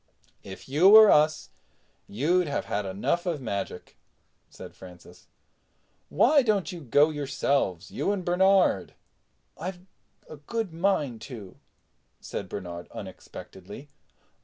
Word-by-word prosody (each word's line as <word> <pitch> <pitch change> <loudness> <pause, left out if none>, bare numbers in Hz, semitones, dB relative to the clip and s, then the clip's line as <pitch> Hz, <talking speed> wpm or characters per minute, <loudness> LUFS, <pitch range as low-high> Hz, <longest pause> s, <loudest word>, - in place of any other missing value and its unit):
"If 95 -1 -11
you 155 +8 +4
were 215 0 +9
us, 155 +1 +2 0.6
you'd 165 - +1
have 145 - -3
had 100 -1 -3
enough 105 - -2
of 165 -4 -1
magic," 100 -7 -6 0.5
said - - -12
Francis. 90 -2 -15 0.8
"Why 285 +3 +4
don't 205 - 0
you 175 - -8
go 145 +3 +3
yourselves—you 140 - -1
and 195 -3 -3
Bernard." 185 - +2 0.6
"I've 175 +2 -6 0.5
a 155 - -10
good 195 +5 -4
mind 160 - -1
to," 105 -8 -10 0.6
said - - -7
Bernard 85 -3 -7
unexpectedly. 100 +10 -11
150 Hz, 110 wpm, -26 LUFS, -, 0.8 s, were